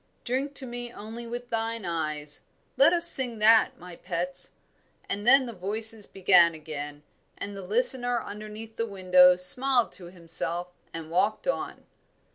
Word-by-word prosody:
'Drink 270 Hz, +3 st, -3 dB
to 270 Hz, -, -5 dB
me 240 Hz, -1 st, -6 dB
only 230 Hz, +2 st, -9 dB
with 240 Hz, +1 st, -8 dB
thine 225 Hz, -2 st, -2 dB
eyes' 155 Hz, -3 st, -2 dB, 0.3 s
let 275 Hz, +5 st, +5 dB
us 345 Hz, -1 st, +4 dB
sing 250 Hz, -8 st, +5 dB
that, 220 Hz, +1 st, +4 dB
my 180 Hz, 0 st, -12 dB
pets." 180 Hz, +1 st, -3 dB, 0.5 s
And 205 Hz, +3 st, -4 dB
then 270 Hz, +1 st, +7 dB
the 235 Hz, -, -7 dB
voices 215 Hz, +3 st, -3 dB
began 180 Hz, -3 st, +3 dB
again, 150 Hz, -1 st, -8 dB, 0.3 s
and 205 Hz, 0 st, -6 dB
the 195 Hz, -, -8 dB
listener 245 Hz, +4 st, +1 dB
underneath 215 Hz, +2 st, -10 dB
the 230 Hz, -, -2 dB
window 185 Hz, -2 st, +4 dB
smiled 245 Hz, +7 st, +3 dB
to 180 Hz, -, -12 dB
himself 170 Hz, 0 st, -3 dB, 0.2 s
and 165 Hz, -1 st, -9 dB
walked 205 Hz, -, -1 dB
on. -, -, -4 dB
210 Hz, 150 wpm, -26 LUFS, 175-240 Hz, 0.5 s, then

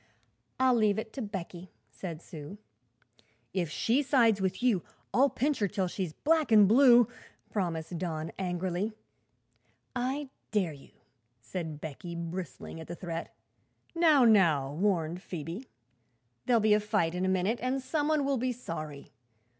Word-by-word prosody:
"I'll 260 Hz, -1 st, +5 dB
leave 215 Hz, -3 st, +3 dB
it 220 Hz, 0 st, -5 dB
to 270 Hz, -, -5 dB
Becky," 185 Hz, -4 st, -6 dB, 0.2 s
said 170 Hz, -4 st, -7 dB
Sue. 155 Hz, +4 st, -9 dB, 1.0 s
"If 180 Hz, -4 st, -1 dB
she 235 Hz, -, +1 dB
sides 235 Hz, -7 st, +3 dB
with 190 Hz, +4 st, -1 dB
you, 225 Hz, -8 st, +3 dB, 0.3 s
I'll 275 Hz, +3 st, +5 dB
pinch 285 Hz, +3 st, 0 dB
her 205 Hz, -, +2 dB
till 190 Hz, -1 st, -1 dB
she's 180 Hz, -2 st, -3 dB
black 310 Hz, -, +1 dB
an' 210 Hz, -2 st, +8 dB
blue," 240 Hz, +1 st, +7 dB, 0.4 s
promised 170 Hz, -4 st, -2 dB
Don 160 Hz, -3 st, -3 dB
angrily. 185 Hz, +3 st, -2 dB, 1.0 s
"I 265 Hz, +3 st, -2 dB, 0.2 s
dare 190 Hz, -7 st, 0 dB
you," 140 Hz, -, -15 dB, 0.5 s
said 160 Hz, +4 st, -5 dB
Becky, 165 Hz, +3 st, -7 dB
bristling 170 Hz, -2 st, -6 dB
at 160 Hz, -, -9 dB
the 175 Hz, -, -5 dB
threat. 170 Hz, -1 st, -5 dB, 0.6 s
"Now 315 Hz, -6 st, +5 dB
now!" 165 Hz, -11 st, +4 dB
warned 175 Hz, -1 st, 0 dB
Phoebe; 175 Hz, -, -6 dB, 0.8 s
"there'll 240 Hz, -2 st, +5 dB
be 215 Hz, 0 st, +4 dB
a 210 Hz, -, +5 dB
fight 210 Hz, -6 st, 0 dB
in 180 Hz, +1 st, -2 dB
a 190 Hz, -, +2 dB
minute, 190 Hz, +5 st, +1 dB
and 255 Hz, +2 st, 0 dB
some 295 Hz, +3 st, -1 dB
one 305 Hz, -2 st, +2 dB
will 275 Hz, -1 st, +1 dB
be 250 Hz, +1 st, 0 dB
sorry. 155 Hz, -, -7 dB
195 Hz, 150 wpm, -30 LUFS, 170-245 Hz, 1.0 s, an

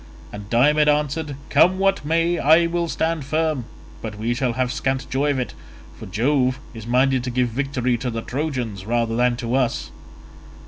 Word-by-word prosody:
And 105 Hz, 0 st, -8 dB
Diomed 150 Hz, +6 st, +4 dB
answered, 150 Hz, 0 st, 0 dB, 0.2 s
"Come 180 Hz, +6 st, +5 dB
what 195 Hz, -3 st, +1 dB
may, 165 Hz, +3 st, +1 dB
I 160 Hz, +4 st, +5 dB
will 170 Hz, 0 st, -1 dB
stand 165 Hz, -1 st, -1 dB
firm; 155 Hz, -2 st, -1 dB, 0.4 s
but 110 Hz, -2 st, -6 dB
we 115 Hz, +3 st, -1 dB
shall 125 Hz, -1 st, -1 dB
have 125 Hz, +1 st, -1 dB
scant 130 Hz, 0 st, -2 dB
joy 140 Hz, +3 st, +1 dB
of 140 Hz, -, +1 dB
it, 125 Hz, -, -3 dB, 0.4 s
for -, -, -10 dB
Jove 125 Hz, +5 st, +1 dB
is 115 Hz, -1 st, -9 dB
minded 130 Hz, +1 st, +2 dB
to -, -, -2 dB
give 125 Hz, 0 st, 0 dB
victory 125 Hz, -1 st, -1 dB
to 125 Hz, -, -2 dB
the 115 Hz, -1 st, -4 dB
Trojans 125 Hz, -9 st, -3 dB
rather 115 Hz, -1 st, 0 dB
than 125 Hz, 0 st, +2 dB
to 120 Hz, 0 st, -4 dB
us." 90 Hz, -, 0 dB
130 Hz, 180 wpm, -22 LUFS, 120-150 Hz, 0.4 s, Come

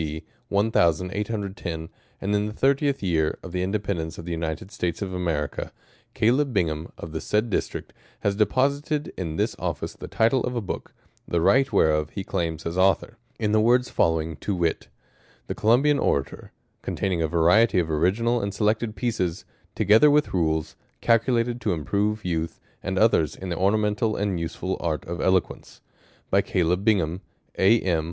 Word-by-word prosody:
D. 80 Hz, +1 st, -5 dB, 0.3 s
1810, 95 Hz, -3 st, 0 dB, 0.3 s
and 100 Hz, +1 st, -2 dB
in 105 Hz, +1 st, +1 dB
the 105 Hz, -, -5 dB
thirty 140 Hz, +5 st, +2 dB
fifth 140 Hz, -6 st, -1 dB
Year 80 Hz, -4 st, +1 dB
of 90 Hz, -, -8 dB
the 90 Hz, 0 st, -2 dB
In 90 Hz, -, -1 dB
dependence 95 Hz, -6 st, -2 dB
of 85 Hz, -, -8 dB
the 85 Hz, -, -5 dB
United 80 Hz, +3 st, -4 dB
States 90 Hz, +2 st, -2 dB
of 95 Hz, -2 st, -5 dB
America, 85 Hz, -5 st, -2 dB, 0.4 s
Caleb 130 Hz, +5 st, +2 dB
Bing 90 Hz, -8 st, +2 dB
ham 80 Hz, +2 st, -6 dB
of 85 Hz, -, -8 dB
the 80 Hz, -, -4 dB
said 110 Hz, +2 st, 0 dB
District, -, -, -3 dB, 0.3 s
has 100 Hz, -1 st, +1 dB
deposited 140 Hz, +7 st, 0 dB
in 80 Hz, -4 st, -4 dB
this -, -, 0 dB
Office -, -, -3 dB
the -, -, -9 dB
title 115 Hz, +3 st, +2 dB
of 125 Hz, -, -2 dB
a -, -, +1 dB
Book, 100 Hz, -, -6 dB, 0.3 s
the 85 Hz, -, 0 dB
right 135 Hz, +10 st, +3 dB
whereof 75 Hz, -1 st, +2 dB
he 100 Hz, -, -5 dB
claims 80 Hz, -3 st, -3 dB
as 85 Hz, +2 st, -2 dB
Author, 95 Hz, +1 st, +2 dB, 0.2 s
in 105 Hz, -2 st, 0 dB
the 110 Hz, 0 st, +4 dB
words 125 Hz, +3 st, +3 dB
following, 80 Hz, -1 st, +1 dB
to 100 Hz, -, -2 dB
wit: 85 Hz, -2 st, -1 dB, 0.3 s
" -, -, -32 dB
The -, -, -3 dB
Columbian 135 Hz, +7 st, +3 dB
Orator: 70 Hz, -1 st, -1 dB, 0.3 s
con -, -, -4 dB
taining 90 Hz, -4 st, 0 dB
a -, -, +1 dB
variety 90 Hz, +7 st, +4 dB
of 85 Hz, -3 st, +1 dB
original 110 Hz, +10 st, +1 dB
and 100 Hz, -, -2 dB
selected 110 Hz, +1 st, 0 dB
pieces; 95 Hz, -5 st, -2 dB, 0.3 s
together 110 Hz, +8 st, +5 dB
with 150 Hz, +1 st, +2 dB
rules; 80 Hz, -3 st, 0 dB, 0.3 s
calculated 120 Hz, +1 st, +2 dB
to 105 Hz, -, 0 dB
improve 100 Hz, +7 st, -1 dB
youth 80 Hz, -2 st, -2 dB, 0.2 s
and 95 Hz, 0 st, -3 dB
others 95 Hz, -8 st, +3 dB
in 95 Hz, -, -7 dB
the 85 Hz, -, -1 dB
ornamental 105 Hz, +4 st, +1 dB
and 100 Hz, -3 st, -1 dB
useful 85 Hz, +3 st, -3 dB
art 80 Hz, -3 st, -2 dB
of 85 Hz, +1 st, -5 dB
eloquence. 95 Hz, -1 st, 0 dB, 0.5 s
By -, -, +5 dB
Caleb 90 Hz, +2 st, 0 dB
Bing 110 Hz, -1 st, +4 dB
ham, 85 Hz, +1 st, -2 dB, 0.4 s
A. 105 Hz, +5 st, +5 dB
m. 85 Hz, -4 st, +1 dB
95 Hz, 180 wpm, -25 LUFS, 85-110 Hz, 0.5 s, together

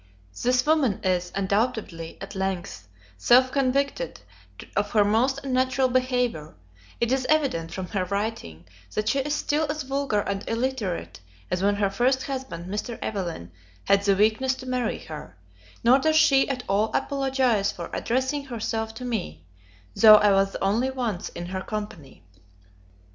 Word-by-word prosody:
This 250 Hz, +1 st, +2 dB
woman 295 Hz, -9 st, +2 dB
is, 180 Hz, -1 st, 0 dB
undoubtedly, 200 Hz, -4 st, -1 dB
at 195 Hz, +1 st, -8 dB
length, 185 Hz, -, -4 dB, 0.3 s
self 255 Hz, -, +5 dB
convicted 275 Hz, -, 0 dB, 0.6 s
of 205 Hz, 0 st, 0 dB
her 210 Hz, -2 st, +5 dB
most 245 Hz, +6 st, +2 dB
unnatural 260 Hz, 0 st, +1 dB
behaviour; 250 Hz, -, -1 dB, 0.4 s
it 235 Hz, 0 st, 0 dB
is 265 Hz, -1 st, 0 dB
evident, 270 Hz, -, +1 dB
from 190 Hz, -, -4 dB
her 190 Hz, -3 st, -1 dB
writing, 200 Hz, -, -4 dB, 0.3 s
that 215 Hz, 0 st, 0 dB
she 275 Hz, -, +1 dB
is 295 Hz, +2 st, -1 dB
still 300 Hz, +1 st, 0 dB
as 305 Hz, -1 st, -2 dB
vulgar 270 Hz, -5 st, 0 dB
and 200 Hz, 0 st, -3 dB
illiterate 230 Hz, -, -2 dB, 0.3 s
as 180 Hz, 0 st, 0 dB
when 200 Hz, +1 st, +2 dB
her 200 Hz, -1 st, 0 dB
first 255 Hz, +6 st, +1 dB
husband, 260 Hz, -11 st, -5 dB
Mr. 210 Hz, +5 st, -4 dB
Evelyn, 170 Hz, -, -4 dB, 0.3 s
had 200 Hz, -, +3 dB
the 200 Hz, -1 st, +3 dB
weakness 220 Hz, +6 st, +2 dB
to 260 Hz, -, -10 dB
marry 250 Hz, -3 st, -1 dB
her; 150 Hz, -, -10 dB, 0.5 s
nor 250 Hz, +3 st, +6 dB
does 315 Hz, +2 st, +2 dB
she 280 Hz, -4 st, +5 dB
at 255 Hz, -2 st, -3 dB
all 205 Hz, +3 st, +2 dB
apologize 260 Hz, -7 st, +1 dB
for 170 Hz, -1 st, -8 dB
addressing 260 Hz, +4 st, -1 dB
herself 225 Hz, -2 st, -3 dB
to 250 Hz, -, -7 dB
me, 85 Hz, -, -4 dB, 0.5 s
though 215 Hz, -1 st, +9 dB
I 210 Hz, -1 st, +5 dB
was 195 Hz, 0 st, +2 dB
only 225 Hz, +7 st, +1 dB
once 240 Hz, -8 st, -3 dB
in 175 Hz, -, -7 dB
her 185 Hz, +1 st, -4 dB
company. 205 Hz, -, -7 dB
225 Hz, 155 wpm, -25 LUFS, 195-260 Hz, 0.6 s, though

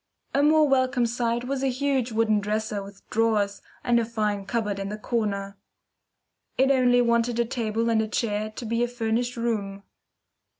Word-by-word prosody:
A 280 Hz, -, +3 dB
more 305 Hz, +1 st, +5 dB
welcome 260 Hz, -2 st, +2 dB
sight 235 Hz, 0 st, -1 dB
was 265 Hz, +1 st, -2 dB
a 270 Hz, -, +1 dB
huge 260 Hz, -1 st, 0 dB
wooden 220 Hz, -1 st, +2 dB
dresser 210 Hz, 0 st, -2 dB
with 195 Hz, 0 st, -13 dB
drawers 210 Hz, -3 st, +1 dB, 0.2 s
and 240 Hz, -1 st, +3 dB
a -, -, +1 dB
fine 210 Hz, -3 st, -2 dB
cupboard 210 Hz, -4 st, -1 dB
in 195 Hz, 0 st, -4 dB
the 210 Hz, -, -5 dB
corner. 200 Hz, -4 st, -2 dB, 1.0 s
It 270 Hz, +1 st, +4 dB
only 245 Hz, -2 st, +4 dB
wanted 235 Hz, 0 st, +1 dB
a 235 Hz, -, +3 dB
table 230 Hz, -2 st, -1 dB
and 225 Hz, -1 st, +3 dB
a 220 Hz, -, -2 dB
chair 215 Hz, -1 st, -1 dB
to 215 Hz, +2 st, -8 dB
be 230 Hz, +2 st, 0 dB
a -, -, +1 dB
furnished 240 Hz, +1 st, -2 dB
room. 205 Hz, -4 st, -2 dB
230 Hz, 175 wpm, -25 LUFS, 210-245 Hz, 1.0 s, more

